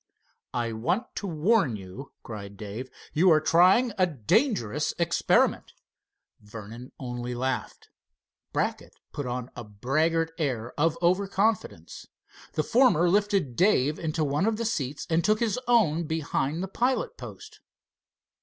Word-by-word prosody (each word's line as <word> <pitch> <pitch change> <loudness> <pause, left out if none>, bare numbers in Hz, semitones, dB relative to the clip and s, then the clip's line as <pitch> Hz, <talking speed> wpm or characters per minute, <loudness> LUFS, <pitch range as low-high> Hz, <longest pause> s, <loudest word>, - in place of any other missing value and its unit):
"I 120 -1 -1
want 170 - -2
to 200 - -3
warn 165 - +2
you," 100 +7 -9
cried 100 -3 -8
Dave. 110 +5 -7 0.2
"You 180 +5 +4
are 155 -2 +6
trying 185 +10 +4
a 185 - +4
dangerous 155 - 0
experiment." 170 0 +1 0.7
Vernon 110 +4 -10
only 125 -1 -5
laughed. 130 +1 -3 0.6
Brackett - - -2 0.2
put 145 -3 -4
on 125 0 -4
a - - -6
braggart 155 +10 0
air 125 -6 -2
of 165 +2 +1
over 185 +3 +3
confidence. 210 +3 -2 0.5
The - - 0
former 230 - +4
lifted 200 - +1
Dave 155 - +2
into 160 -1 -1
one 150 +7 0
of 225 -1 0
the 230 - -2
seats 145 - -2
and 165 0 +1
took 215 +1 +2
his 230 0 0
own 175 -9 +3
behind 160 0 -1
the - - -3
pilot 245 +7 -1
post. - - -11
155 Hz, 135 wpm, -27 LUFS, 125-190 Hz, 0.7 s, are